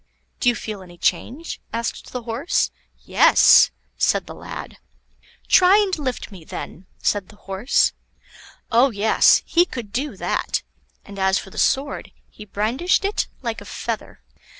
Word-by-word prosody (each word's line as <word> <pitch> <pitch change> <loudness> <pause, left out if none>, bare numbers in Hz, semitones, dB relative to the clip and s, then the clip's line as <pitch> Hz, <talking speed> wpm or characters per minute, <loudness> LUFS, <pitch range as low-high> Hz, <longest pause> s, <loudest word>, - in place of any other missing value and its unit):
"Do 245 - +3
you 240 - +1
feel 215 -4 -6
any 175 -2 -14
change?" 250 - -2
asked 230 +1 -4
the 250 -2 -5
Horse. 240 - 0 0.3
"Yes," - - +6 0.3
said - - +2
the - - -9
lad. - - -9 0.7
"Try 375 +1 +6
and 400 -3 +2
lift 255 -6 -4
me, 185 -5 -11
then," 180 +3 -8
said 205 -3 -1
the 215 - -15
Horse. 200 +4 +1 0.8
Oh 245 +4 +5
yes! 220 -1 +4
he 340 - +4
could 240 - -7
do 280 +5 -3
that, - - -2 0.4
and 200 -1 -10
as 190 0 +3
for 195 - -7
the - - -6
sword, 280 +2 0 0.2
he 210 - -12
brandished 235 - 0
it 405 - 0 0.2
like 230 -2 -3
a - - -11
feather. - - -6
230 Hz, 150 wpm, -22 LUFS, 200-280 Hz, 0.8 s, Yes